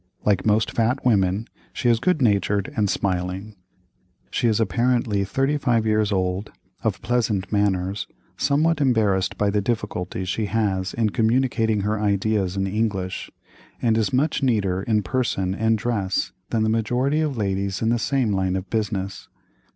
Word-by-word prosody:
Like 105 0 +2
most 110 +1 +2
fat 120 +4 0
women, 100 -2 +2 0.3
she 125 - -1
is 115 -1 +4
good 155 +1 +1
natured 100 -2 +1
and 105 -2 +1
smiling. 95 +3 -2 0.8
She 120 - +1
is 110 -1 +2
apparently 115 -2 +1
35 135 0 +1
years 110 -1 +2
old, 95 +1 -1 0.3
of - - -1
pleasant 110 -6 0
manners, 100 -1 0 0.3
somewhat 150 +2 +1
embarrassed 110 -8 +2
by 105 -1 +1
the 105 0 +1
difficulty 95 -4 -3
she 100 +4 -1
has 100 -4 -1
in 110 -3 +1
communicating 115 -2 +1
her 105 +2 -1
ideas 100 -2 0
in 95 - 0
English, 95 -2 -2 0.5
and 115 -2 +2
is 110 -3 +1
much 140 +4 +1
neater 100 -8 +1
in 105 0 +1
person 95 -2 -1
and 110 +2 +1
dress 105 -4 -1 0.2
than 110 -2 +1
the - - +2
majority 125 +7 +1
of 150 -5 -1
ladies 100 -1 -1
in 110 - +2
the 120 0 +2
same 125 -4 +1
line 95 -1 0
of 95 0 -5
business. 100 -3 -2
105 Hz, 155 wpm, -23 LUFS, 95-115 Hz, 0.8 s, is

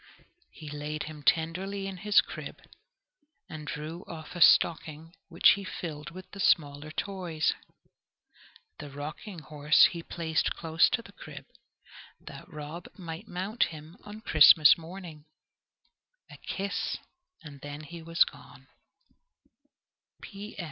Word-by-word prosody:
He 155 - -12
laid 150 +1 -4
him 155 -1 -9
tenderly 185 +6 0
in 195 -1 -5
his 205 +2 +4
crib, - - -8 0.9
and 155 -1 -8
drew 155 +4 -5
off 160 +1 -9
a 175 - -5
stocking, 160 -1 +4 0.2
which 170 -1 +5
he 200 - -1
filled 150 -5 -6
with 185 +1 -10
the 200 - -10
smaller 145 -4 +2
toys. 175 -3 -1 1.3
The 145 - -7
rocking 155 +8 -7
horse 150 -1 +4
he 170 - -6
placed 160 -1 -1
close 165 0 +3
to 235 - 0
the - - -14
crib, - - -11 0.7
that 195 - -12
Rob 155 +3 -7
might 165 -3 -8
mount 190 +6 0
him 155 +1 -10
on 210 +1 -10
Christmas 155 -5 +8
morning. 165 -2 -10 1.1
A - - -11
kiss, 200 +1 -3 0.5
and 140 -3 -12 0.2
he 170 +2 -9
was 165 +1 +4
gone. - - -13
165 Hz, 120 wpm, -29 LUFS, 155-185 Hz, 1.3 s, Christmas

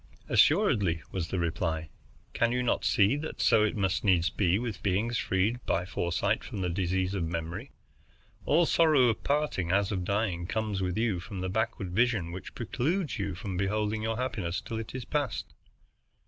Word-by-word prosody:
"Assuredly," 100 - +3
was 90 -3 -2
the 95 - -3
reply. 80 -2 -2 0.4
"Can 120 0 +2
you 125 0 0
not 120 - +1
see 100 +5 +4
that 155 +2 -6
so 115 -3 +4
it 110 - 0
must 95 -1 0
needs 90 -3 +3
be 95 -2 +2
with 115 -4 -4
beings 105 +5 0
freed 105 +6 0
by 90 - +1
foresight 95 +3 -1
from 105 -7 -5
the 90 - 0
disease 95 +1 0
of 95 -4 -1
memory? 85 +8 -4 0.7
All 160 +4 +3
the - - -1
sorrow 155 -7 +5
of 110 - -2
parting, 140 - 0
as 100 +1 +2
of 95 -3 -1
dying, 95 -3 -1
comes 105 -2 -2
with 90 0 -1
you 110 -5 +1
from 95 +2 -7
the 95 - -2
backward 100 -2 -2
vision 105 -4 +1
which 90 +1 -8
precludes 145 - -1
you 100 -2 -2
from 95 +1 -5
beholding 105 +2 0
your 110 0 -1
happiness 105 -9 -2
till 115 - -5
it 115 +2 -7
is 130 -2 -5
past. 140 -9 -2
100 Hz, 185 wpm, -29 LUFS, 90-115 Hz, 0.7 s, sorrow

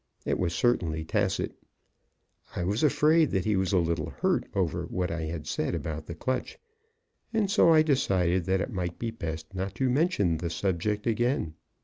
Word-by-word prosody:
It - - 0
was 85 -2 0
certainly 80 -10 +1
tacit. - - 0 1.0
I 90 - -1
was 100 +6 0
afraid 155 +1 +4
that 95 -2 -1
he 105 -1 +2
was 95 -1 0
a 95 - +3
little 85 -3 0
hurt - - 0
over 85 -2 0
what 90 -1 -2
I 85 -1 -3
had 80 -1 -5
said - - -1
about 80 -1 -5
the 85 - -6
clutch, 130 +10 -3 0.7
and 215 -4 +1
so 200 -5 +5
I 155 -1 +6
decided 95 - +1
that 95 0 +1
it 120 - -4
might 90 -3 -3
be 115 -1 -3
best 80 -4 -6
not 95 +1 -4
to 130 -2 +1
mention 125 - +2
the 85 +1 -3
subject 100 +4 -1
again. 120 - 0
95 Hz, 180 wpm, -28 LUFS, 85-125 Hz, 1.0 s, I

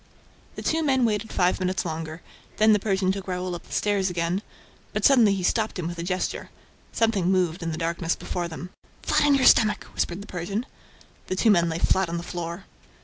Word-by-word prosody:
" - - -30
The - - -7
two 325 +1 +1
men 265 -5 +2
waited 215 0 -1
five 180 0 +1
minutes 185 0 -1
longer. 160 0 -5 0.3
Then 215 0 +5
the 210 - +3
Persian 190 -2 +1
took 195 0 -5
Raoul 180 0 -3
up 175 - -8
the - - -18
stairs 200 -2 +1
again; 175 +2 -1 0.5
but - - 0
suddenly 235 -8 +6
he 190 - -4
stopped 220 +3 0
him 180 - -3
with 175 0 -6
a - - -3
gesture. 185 +1 -3 0.4
Something 215 -6 +1
moved 180 -2 +1
in 165 -1 -2
the 160 - -4
darkness 165 0 -1
before 175 -1 -4
them. 175 +2 -8 0.3
"Flat - - +2
on 285 - +5
your 270 - +2
stomach!" 215 -2 +5
whispered 175 +3 -2
the - - -12
Persian. 195 +5 -4 0.6
The 185 - -2
two 220 +3 +4
men 170 -3 +3
lay 160 - -2
flat 190 +1 +2
on 170 - -2
the 170 - -5
floor. 175 +1 -6
185 Hz, 215 wpm, -25 LUFS, 170-210 Hz, 0.6 s, suddenly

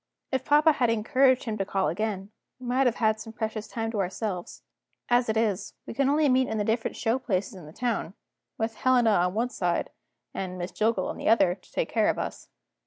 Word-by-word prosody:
If 260 -1 0
papa 300 +2 +5
had 250 -5 +1
encouraged 255 +3 +3
him 220 -4 -4
to - - +2
call 195 -1 0
again, 205 -2 -3 0.3
we 255 - -10
might 255 +2 +2
have 240 - +1
had 220 -1 +1
some 225 0 -8
precious 220 -1 -4
time 225 -1 -3
to 215 - -3
ourselves. 185 -1 -3 0.5
As 240 -1 +3
it 220 - +1
is, 210 -3 -1
we - - -6
can 270 +3 +2
only 300 +1 +3
meet 260 -1 +3
in 220 - -2
the 210 - +1
different 225 +2 -1
show 230 +3 +1
places 195 -6 -2
in 180 -5 -11
the - - -11
town 220 -3 -2 0.4
with 225 0 -1
Helena 250 -3 +4
on 180 -1 +2
one 240 +3 0
side, 175 -6 -1 0.4
and 185 -1 -4
Miss 175 0 -4
Jillgall 220 +4 0
on - - -5
the - - -1
other, 195 -6 +5
to 185 - -18
take - - -1
care - - +2
of - - 0
us. - - -5
225 Hz, 225 wpm, -27 LUFS, 195-250 Hz, 0.5 s, papa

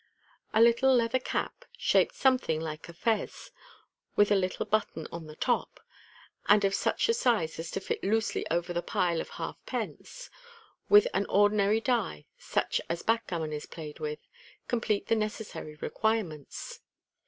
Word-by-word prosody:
A. 220 - +2
little 235 +3 +5
leather 235 +1 +2
cap - - -3
(shaped - - +3
something 255 - +2
like 160 0 -6
a - - -9
fez, 220 +5 -2 0.6
with 205 0 +4
a - - +6
little 185 -1 0
button 210 -7 -1
on 165 -2 -7
the 155 - -10
top, 245 +8 -1 0.7
and 205 0 +6
of 195 - +1
such - - +1
a 460 - +3
size 220 - +1
as 165 0 -5
to - - -3
fit 190 - -4
loosely 220 +2 0
over 175 +1 -1
the 175 - -1
pile 175 -4 0
of - - -8
half - - -6
pence), - - -5 0.6
with 415 +4 +8
an - - 0
ordinary 205 +1 +3
die, 225 - -1
such - - 0
as 170 0 -2
backgammon 185 -9 -1
is 150 - -5
played 155 -3 -8
with, 150 -1 -5 0.4
complete 220 -4 0
the 225 - +2
necessary 215 -7 -4
requirements. 180 -4 -2
205 Hz, 155 wpm, -29 LUFS, 165-225 Hz, 0.7 s, with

